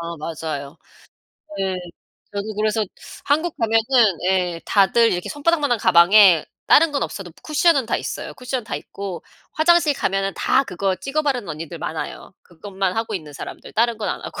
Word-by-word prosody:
아 170 0 -5
맞아요. 155 -2 -5 0.8
네. 190 -1 -1 0.6
저도 205 +1 -4
그래서 215 +1 0 0.4
한국 315 +4 0
가면은 225 -3 +3
예 180 -3 0
다들 225 +3 +3
이렇게 175 0 -3
손바닥만한 290 -5 +1
가방에 175 -1 +6 0.2
다른 325 +1 +6
건 280 - -1
없어도 190 -4 -7
쿠션은 305 -4 +2
다 - - 0
있어요 - - -6
쿠션은 250 -1 -4
다 - - -5
있고. 195 -3 -7 0.3
화장실 325 -2 +3
가면은 195 -4 -1
다 270 - +2
그거 190 -2 -2
찍어 275 - -2
바르는 255 - -1
언니들 160 +2 -6
많아요. 160 +3 -6
그것만 190 +2 -4
하고 225 -1 -2
있는 155 -5 -6
사람들 - - -9
다른 230 +1 +1
건 215 - -3
안 - - -3
하고. - - -7
205 Hz, 350 characters per minute, -21 LUFS, 175-255 Hz, 0.8 s, 가방에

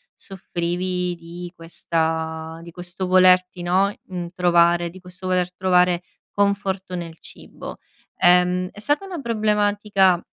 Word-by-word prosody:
soffrivi 180 -1 -3
di 170 +1 -9
questa 160 -1 -3
di 170 - -10
questo 180 +2 -4
volerti, 185 -1 +4
no, 190 +3 +2
mhmm, 180 -2 -5
trovare 175 -1 +3
di 185 +2 -13
questo 185 +1 -9
voler 180 -1 0
trovare 180 -1 +2 0.3
conforto 200 -2 -1
nel 165 -2 -6
cibo. - - -10 0.4
Ehm, 180 +1 +4
è - - -13
stata 290 - 0
una 365 -4 -6
problematica 205 -5 +2
180 Hz, 120 wpm, -22 LUFS, 175-190 Hz, 0.4 s, volerti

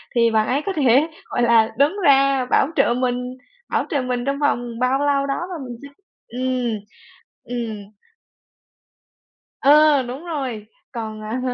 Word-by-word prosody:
thì 230 -1 +3
bạn 220 -1 +2
ấy 275 +3 0
có 390 - -1
thể, 275 0 +4 0.2
gọi - - -2
là, 230 -2 +4
đứng 285 +7 +3
ra 275 -2 +4
bảo - - +4
trợ 235 - +3
mình 250 0 -2 0.3
bảo - - 0
trợ 285 - 0
mình 250 -1 -3
trong 275 0 -1
vòng 240 -5 -1
bao 255 +2 +1
lâu 285 -1 +1
đó 275 - -2
và 320 -7 -6
mình 240 -1 -8
sẽ - - -8 0.4
ừm, 250 -2 -2 0.6
ừm. 230 -4 -5 1.8
Ờ, 295 0 +5
đúng 255 +6 -7
rồi. 260 -10 -4 0.3
Còn, 220 -3 -6
à, 220 +4 -4
255 Hz, 155 wpm, -21 LUFS, 235-275 Hz, 1.8 s, Ờ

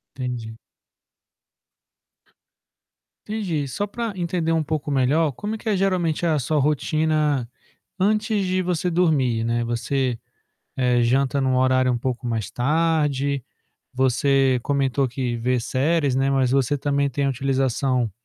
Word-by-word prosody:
Entendi. 120 -4 -5 2.7
Entendi. 180 -10 -2
Só 140 +11 -2
pra 230 +2 -4
entender 170 -2 -1
um 165 -1 +2
pouco 150 -1 -3
melhor, 145 +3 +2
como 210 - -4
é - - -5
que 220 - -6
é 210 - +2
geralmente 180 -4 0
a 160 -3 +2
sua 150 +4 0
rotina 150 -2 +1 0.5
antes 210 +1 +1
de 185 0 0
você 180 0 -1
dormir, 145 -10 +2
né? 120 +1 0
Você, 120 +1 -1 0.6
eh, 125 -2 +2
janta 135 +3 +2
num 130 -1 +1
horário 130 0 +3
um 120 - 0
pouco 125 0 -3
mais 110 -3 -3
tarde? 140 0 0 0.5
Você 130 0 +2
comentou 140 -1 +1
que 125 -1 -3
vê 125 +2 0
séries, 140 +3 0
né, 135 +1 +2
mas 130 -2 +2
você 135 +1 +2
também 140 0 0
tem 140 +2 -1
a 140 - +2
utilização 130 -3 0
140 Hz, 140 wpm, -23 LUFS, 125-160 Hz, 2.7 s, horário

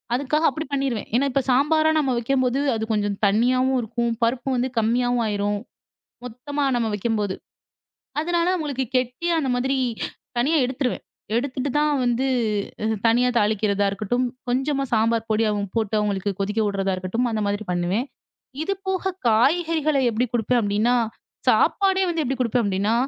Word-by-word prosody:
அதுக்காக 300 +5 0
அப்பிடி 315 0 -5
பண்ணிருவேன். 270 -6 -1
ஏன்னா, 265 +4 +3
இப்ப 275 - +1
சாம்பாரா 310 +5 +3
நம்ம 270 -4 +1
வைக்கும்போது 255 +2 +1 0.2
அது 220 - -3
கொஞ்சம் 205 -1 -1
தண்ணியாவும் 255 +6 +2
இருக்கும். 235 +1 -2
பருப்பு 245 +3 0
வந்து 250 +1 0
கம்மியாவும் 245 +2 +1
ஆயிரும். 205 0 -1 0.7
மொத்தமா 270 +5 -4
நம்ம 235 -2 0
வைக்கும்போது. 210 -2 -1 0.9
அதனால 345 +1 0
அவுங்களுக்கு 285 -6 -2
கெட்டி 250 +7 -2
அந்த 270 -4 -1
மாதிரி 265 +2 0 0.6
தனியா 305 +6 +2
எடுத்துருவேன். 255 -1 -2 0.3
எடுத்துட்டு 260 +2 -1
தான் 300 0 +2
வந்து 245 +2 +1 0.6
அ - - 0 0.2
தனியா 245 +2 +4
தாளிக்கிறதா 205 -1 +1
இருக்கட்டும், 215 +5 -1 0.2
கொஞ்சமா 270 +2 0
சாம்பார் 225 0 +2
பொடி 220 +1 +2 0.3
போட்டு 220 -1 0
அவுங்களுக்கு 205 -1 -1
கொதிக்க 210 +3 -1
உட்றதா 195 -1 -1
இருக்கட்டும், 205 +7 -1
அந்த 220 - -1
மாதிரி 205 +1 -2
பண்ணுவேன். 180 +8 0 0.6
இதுபோக 380 0 -2 0.2
காய்கறிகள 310 +6 +2
எப்பிடி 235 +3 0
குடுப்பேன்? 240 +1 +2
அப்பிடின்னா 210 +4 +2 0.5
சாப்பாடே 385 -1 +3
வந்து 330 -2 -1
எப்பிடி 265 0 -2
குடுப்பேன்? 240 0 +1
அப்பிடின்னா, 200 +3 0
245 Hz, 140 wpm, -23 LUFS, 215-275 Hz, 0.9 s, தனியா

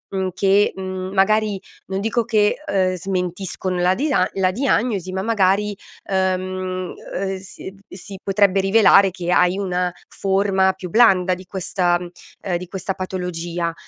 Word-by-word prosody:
mhmm, 190 -1 0
che, 200 +2 +3
mhmm, 185 0 -5
magari 205 0 +2 0.3
non 190 0 -3
dico 225 +3 0
che, 210 -2 +2
ehm, 185 -2 +1
smentiscono 185 0 -3
la 180 +1 +3
disa 260 -9 +1
la 185 -1 +2
diagnosi, 215 -5 0
ma 190 - -2
magari, 205 -1 +1 0.3
ehm, 185 -1 -1
uhm, 190 +1 -5
si 190 0 -10
d 195 - -20
si 195 +1 -9
potrebbe 195 -1 +3
rivelare 195 -1 +5
che 175 -1 -4
hai 180 +1 +3
una 180 -2 -1 0.2
forma 195 -1 +1
più 185 -1 -8
blanda 190 -4 +4
di 185 +1 -8
questa 180 -1 0 0.4
ehm, 180 -3 -1
di 180 +1 -8
questa 190 +1 -4
patologia, 175 -2 -4
190 Hz, 145 wpm, -21 LUFS, 185-200 Hz, 0.4 s, rivelare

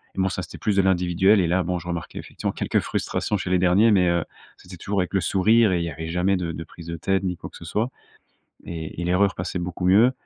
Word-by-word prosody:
et - - -5
bon, 95 - +2
ça, 90 - -3
c'était - - -9
plus 105 - 0
de 100 - +5
l'individuel. 95 +2 +3
Et 90 - +2
là, 90 +2 +1
bon, 90 +1 -2
je 85 - -12
remarquais 85 -1 -5
effectivement - - -4
quelques - - 0
frustrations 105 - -2
chez 95 -1 -4
les 90 0 +3
derniers. 95 +5 +4
Mais, 90 -4 +4
heu, 85 -1 0 0.3
c'était 90 0 -12
toujours 100 +3 -2
avec 90 +1 -2
le 95 - +2
sourire 105 +5 +3
et 90 - +2
il 85 - -1
y - - -3
avait 80 +1 -6
jamais 90 +3 +1
de 85 -2 -3
de 80 +1 -6
prise 85 -1 -13
de 85 0 -4
tête 95 +4 0
ni 90 -2 -2
quoi - - -8
que - - -16
ce - - -12
soit. 110 +4 -1 0.8
Et 80 -1 -6
et - - -2
l'erreur 95 +3 +2
passait 90 +1 -3
beaucoup 90 0 -3
mieux. 110 +7 +5
90 Hz, 270 wpm, -24 LUFS, 85-95 Hz, 0.8 s, de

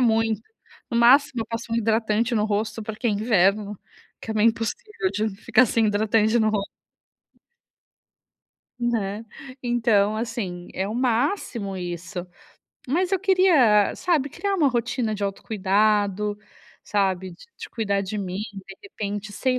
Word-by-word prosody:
muito. 225 -3 +2 0.5
No 235 - -2
máximo 255 +2 +5
eu 225 - -3
passo 230 0 -5
um - - +1
hidratante 225 +1 +1
no 210 - +2
rosto, 215 +1 -2
porque 220 +3 -3
é - - +2
inverno, 205 -1 +2 0.4
que - - -7
é - - -2
meio 215 +1 +5
impossível 225 - -3
de 210 +2 -1
ficar 250 - +4
sem 225 0 +2
hidratante 215 +2 +2
no 220 -1 +3
ros 205 -2 0 2.2
Né. 225 -3 -1 0.4
Então 225 -4 +2
assim, 215 -6 -4
é 190 - -2
o 210 - -4
máximo 240 - -1
isso. 175 +1 -5 0.6
Mas 350 +8 0
eu 385 - +3
queria, 345 - +4
sabe, 315 -6 +1
criar 400 +7 -2
uma 315 -7 +3
rotina 235 -2 -1
de 205 -1 -3
autocuidado, 205 0 0 0.5
sabe. 190 -2 0
D 170 - -13 0.2
de - - -9
cuidar 200 -3 -1
de 200 +2 -4
mim, 190 -1 -4
de 195 -1 -10
repente, 205 - -5
sei 255 +4 0
220 Hz, 145 wpm, -24 LUFS, 200-240 Hz, 2.2 s, máximo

